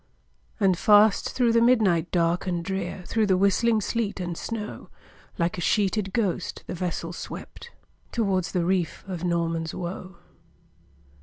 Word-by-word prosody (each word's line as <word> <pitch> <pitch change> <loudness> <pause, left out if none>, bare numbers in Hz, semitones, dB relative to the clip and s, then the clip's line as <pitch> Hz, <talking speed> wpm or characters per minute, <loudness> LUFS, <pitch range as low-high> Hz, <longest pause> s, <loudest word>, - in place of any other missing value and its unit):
And 190 -4 +3
fast 210 0 +5
through 245 -2 +2
the 230 - +4
midnight 210 -9 +3
dark 175 +1 +1
and 175 -2 -2
drear, 190 -1 -4
Through 220 -2 +1
the 190 -2 +3
whistling 215 +4 +3
sleet 210 -1 -2
and 175 -2 -3
snow, 215 +3 -6 0.5
Like 170 +1 -1
a - - -3
sheeted 200 +1 +1
ghost, 205 -4 -2
the - - -5
vessel 170 -1 -3
swept - - -8 0.4
Towards 195 -6 0
the 175 -3 0
reef 180 -3 -1
of 180 -3 -5
Norman's 165 -2 -1
Woe. 185 +1 -6
190 Hz, 145 wpm, -25 LUFS, 175-210 Hz, 0.5 s, fast